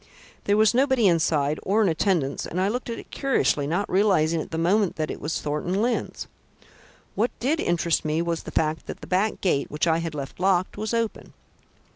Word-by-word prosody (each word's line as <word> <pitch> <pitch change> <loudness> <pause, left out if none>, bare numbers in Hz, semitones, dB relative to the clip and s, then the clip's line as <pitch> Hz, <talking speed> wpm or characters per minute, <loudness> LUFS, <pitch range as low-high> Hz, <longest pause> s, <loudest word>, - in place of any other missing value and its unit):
There 205 +1 +3
was 215 0 +4
nobody 260 -3 +3
inside 155 -4 +2
or 210 +3 +2
in - - +3
attendance 160 -4 0
and 180 - -3
I 190 +2 +2
looked 245 +3 -3
at 230 - -3
it - - -11
curiously, 250 - +1
not 175 +7 -1
realising 175 -5 +2
at - - -8
the 160 - -4
moment 190 +4 +2
that 155 -1 -2
it - - -7
was 155 +2 -3
Mr. - - -3
Thornton 150 +6 -2
Lyne's. 235 +2 -1 0.9
What 230 +4 +1
did 295 +6 0
interest 170 -1 +1
me 155 +1 0
was 170 -1 -1
the - - -8
fact 155 0 -1
that - - -7
the - - -8
back 195 +4 0
gate, 145 -7 +1
which 150 - -1
I 165 -1 +2
had 165 -2 -4
left 140 +1 -6
locked, 185 -1 +1
was 215 +2 -2
open. 230 -2 -3
180 Hz, 210 wpm, -25 LUFS, 160-215 Hz, 0.9 s, was